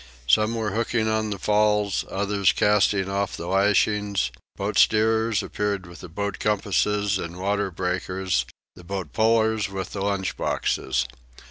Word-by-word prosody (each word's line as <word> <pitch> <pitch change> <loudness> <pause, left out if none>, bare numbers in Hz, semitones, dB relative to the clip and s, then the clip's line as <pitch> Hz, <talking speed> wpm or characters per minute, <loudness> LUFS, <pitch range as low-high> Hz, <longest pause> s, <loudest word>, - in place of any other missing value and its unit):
Some 110 - +3
were 110 -2 -2
hooking 110 +1 0
on 110 0 0
the 100 - -3
falls, 105 0 +2
others 100 -1 +1
casting 105 -2 +2
off 100 +1 -2
the 85 - -6
lashings; 100 -3 +1 0.2
boat - - -1
steerers 110 0 +3
appeared 100 -2 -2
with 85 0 -12
boat 100 -1 -3
compasses 105 -1 +1
and 85 0 -6
water 100 +1 -1
breakers, 95 +1 -2 0.3
and 90 -2 -15
boat 95 -1 -5
pullers 110 -1 +2
with 95 -1 -5
the 100 - -5
lunch 100 -3 -1
boxes. 65 -2 -1
100 Hz, 140 wpm, -24 LUFS, 95-105 Hz, 0.3 s, Some